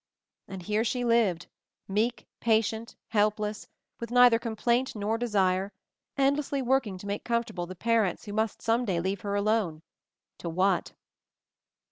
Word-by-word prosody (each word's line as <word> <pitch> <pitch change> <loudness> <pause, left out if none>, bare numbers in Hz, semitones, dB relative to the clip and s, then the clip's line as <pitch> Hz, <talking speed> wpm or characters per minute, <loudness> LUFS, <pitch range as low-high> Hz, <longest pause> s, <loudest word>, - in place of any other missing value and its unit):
And 190 -2 -7
here 210 +3 +1
she 245 +1 -1
lived, 220 -7 +2 0.4
meek, 220 +5 0
patient, 225 0 0
help 210 -1 +2
less, 210 0 -4 0.3
with 235 - -5
neither 245 -1 +6
complaint 235 +2 0
nor 210 +1 -1
desire, 195 -4 +1 0.5
end 275 +1 +3
lessly 280 -2 -2
working 245 -7 +1
to 185 - -11
make 200 +1 -3
comfortable 225 -7 -2
the 185 - -8
pa 230 +5 +1
rents 195 -6 0
who 205 - -6
must 220 +1 -1
some 230 +2 +2
day 190 -7 0
leave 190 +2 -2
her 200 -1 -2
alone 200 -6 0 0.3
— - - -63
to 170 - -4
what 185 +2 +1
215 Hz, 160 wpm, -28 LUFS, 195-235 Hz, 0.5 s, neither